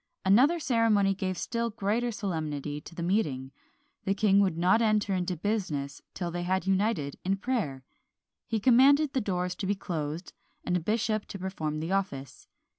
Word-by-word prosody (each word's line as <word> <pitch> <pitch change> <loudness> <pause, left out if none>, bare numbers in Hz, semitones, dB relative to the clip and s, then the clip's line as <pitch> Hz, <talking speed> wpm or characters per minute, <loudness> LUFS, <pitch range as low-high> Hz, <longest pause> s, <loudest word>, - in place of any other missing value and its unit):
Another 260 - +5
ceremony 225 -8 +3
gave 185 -1 -3
still 235 0 -2
greater 225 +3 -1
solemnity 155 -8 -3
to 170 - -12
the 170 - -4
meeting; 150 -9 0 0.5
the 195 - 0
king 200 -1 +4
would 190 -5 +2
not 180 +6 +4
enter 215 -3 +2
into 180 -1 -1
business 155 -8 -2
till 175 -2 -3
they 175 +1 -3
had 185 +1 0
united 190 -7 0
in 195 +2 0
prayer. 195 - -2 0.6
He 225 - 0
commanded 270 +6 +5
the 260 - +1
doors 180 -3 -1
to 195 - -3
be 200 - +1
closed, 165 -2 -4 0.3
and 180 - 0
a - - +2
bishop 215 +3 -1
to - - -7
perform 160 -5 -3
the 165 +3 -3
office. 185 -9 -3
195 Hz, 170 wpm, -29 LUFS, 170-220 Hz, 0.6 s, Another